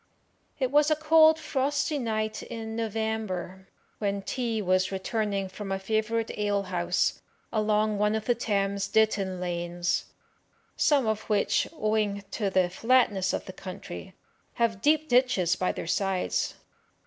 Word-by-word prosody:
It 260 -2 0
was 295 +1 +4
a 310 - +4
cold, 315 +1 +6
frosty 290 0 -1
night 215 -3 -2
in 225 -1 -6
November, 220 -4 -3 0.3
when 200 -1 -1
T 230 0 -2
y 200 - -5
was 185 +1 +2
returning 200 0 -1
from 195 +1 -7
a 195 - 0
favourite 220 +3 -1
alehouse, 185 -4 0 0.3
along 215 -1 +1
one 210 +1 +2
of 220 -1 -3
the 240 - +3
Thames 200 -4 -1
Ditton 200 -4 +1
lanes, 175 0 -1 0.7
some 285 -4 +3
of 220 -1 0
which, 210 -1 +2
owing 215 -6 0
to 205 -3 -1
the 185 -2 +2
flatness 210 -3 +2
of - - -3
the 185 - -8
country, 180 - -8 0.4
have 225 -4 0
deep 310 +1 +3
ditches 245 - +3
by 185 - 0
their - - -6
sides. 190 +1 0
215 Hz, 140 wpm, -27 LUFS, 190-230 Hz, 0.7 s, cold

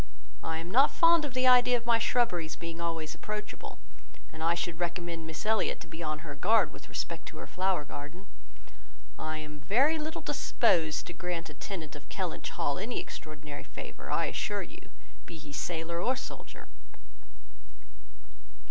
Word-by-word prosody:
I 160 0 -1
am 165 +2 -5
not 265 +6 +7
fond 335 -2 +6
of 265 -3 -5
the 255 0 +3
idea 250 -1 +7
of 235 - -8
my 235 -1 +5
shrubberies 180 -10 +2
being 170 0 -5
always 165 -2 -2
approachable; 210 0 -5 0.6
and 160 - -8
I 165 +1 +3
should 170 -1 -2
recommend 170 -1 -2
Miss 160 +4 -5
Elliot 220 0 +2
to - - -8
be 160 - -7
on 155 0 -2
her 145 - -5
guard 210 +5 +4
with - - -11
respect 165 -1 -3
to - - -8
her - - -5
flower 185 -4 +1
garden. 150 +7 -7 0.9
I 155 0 -2
am 150 -1 -7
very 260 - +4
little 310 +2 -3
disposed 160 -3 +2
to 175 - -6
grant 170 -2 -3
a - - -10
tenant 160 -1 -5
of 145 - -11
Kellynch 185 -4 -2
Hall 145 +2 0
any 230 +5 -1
extraordinary 150 -2 -7
favour, - - -8
I - - +2
assure - - -1
you, - - -12 0.4
be 165 - -7
he 150 -2 -10
sailor 165 +5 -1
or 255 +6 +3
soldier." - - -8
170 Hz, 170 wpm, -31 LUFS, 155-215 Hz, 0.9 s, not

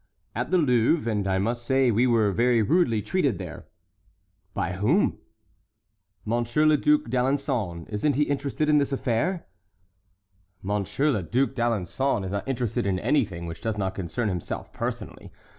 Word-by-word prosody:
"At 125 +2 -3
the 185 - +3
Louvre, 125 -2 +2
and 105 -2 -1
I 95 0 +1
must 115 +5 -1
say 130 0 +3
we 120 +4 +3
were 110 -4 +3
very 120 +2 +3
rudely 120 - +2
treated 145 - 0
there." - - -8 0.9
"By 90 - -1
whom?" 110 - +1 1.1
"Monsieur 120 +6 +1
le 155 0 +6
Duc 300 - +3
d'Alençon. 125 -9 -1
Isn't 115 +7 0
he 150 - +3
interested 145 +1 -1
in 150 -1 +5
this 140 0 0
affair?" 135 +8 -1 1.2
"Monseigneur 105 +9 0
le 105 - -1
Duc 125 +10 0
d'Alençon 120 -1 0
is 95 - -4
not 100 +3 -3
interested 120 -4 -1
in 95 -2 +1
anything 95 - 0
which 85 0 -7
does 110 -2 -2
not 95 -2 -1
concern 95 +5 -3
himself 90 -4 -4
personally. - - -5
120 Hz, 155 wpm, -26 LUFS, 100-140 Hz, 1.2 s, le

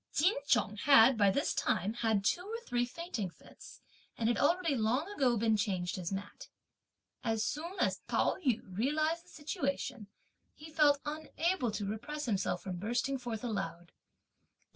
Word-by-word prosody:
Ch'in 360 +7 +3
Chung 210 - +2
had, 260 0 +7
by 205 -3 +4
this 280 +9 +1
time, 205 +4 0
had 220 -4 0
two 345 - +2
or 435 +5 -5
three 245 0 0
fainting 250 - -4
fits, - - -15 0.4
and 230 0 +1
had 240 - +1
already 335 +1 +2
long 250 +6 +1
ago 260 - +2
been 220 0 +3
changed 190 -4 -1
his 180 -1 -4
mat. 195 +1 -6 0.7
As 225 -2 0
soon 335 - -4
as - - +1
Pao - - +2
yü 250 -6 +2
realised 310 - 0
the - - -20
situation, 275 - -3 0.5
he 310 +1 -12
felt 290 -2 +4
unable 315 -1 -1
to 205 -1 -3
repress 265 +9 -4
himself 195 -5 -1
from 185 -2 -4
bursting 240 +7 -1
forth 235 -3 -5
aloud. 195 -7 -4
245 Hz, 160 wpm, -33 LUFS, 210-300 Hz, 0.7 s, had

